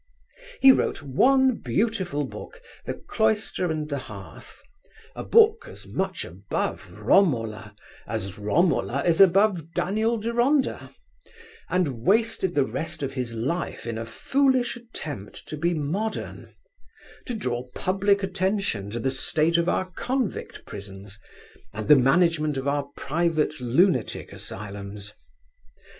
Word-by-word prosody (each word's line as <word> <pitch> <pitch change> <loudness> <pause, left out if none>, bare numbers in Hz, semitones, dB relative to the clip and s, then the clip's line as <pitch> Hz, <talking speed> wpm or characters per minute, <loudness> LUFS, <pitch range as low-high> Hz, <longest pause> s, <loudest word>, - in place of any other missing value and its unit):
He 270 - +9
wrote 205 - 0
one 260 - +3
beautiful 190 -9 -1
book, - - -10 0.3
The - - -2
Cloister 220 -5 0
and 155 -1 -2
the 140 -2 -3
Hearth, - - -11 0.6
a - - -5
book 450 0 +4
as - - -10
much - - -3
above - - -4
Romola 115 - +1 0.3
as 105 -2 -4
Romola 140 - +1
is 170 +1 +4
above 185 -3 +4
Daniel 220 +5 +1
Deronda, 240 +6 +1 0.8
and 150 -11 0
wasted 215 - +2
the 140 -2 +3
rest 160 +1 -4
of 135 0 -3
his 125 -4 -3
life 140 +9 -3
in 115 -1 -3
a 115 - -4
foolish 260 - +1
attempt 155 - -8
to - - -4
be 170 +3 0
modern, 185 +9 -4 0.7
to 245 - -3
draw 125 - -3
public 200 +2 +1
attention 190 - -1
to 115 +3 -4
the 130 +3 0
state 155 +5 +1
of 170 +1 +1
our 185 0 -1
convict 250 +4 -3
prisons, 100 0 -9 0.6
and 110 0 -4
the 150 - +9
management 155 +2 +3
of 135 +1 -3
our 140 0 0
private 155 0 0
lunatic 130 - +1
asylums. 100 0 -6
165 Hz, 125 wpm, -25 LUFS, 125-205 Hz, 0.8 s, He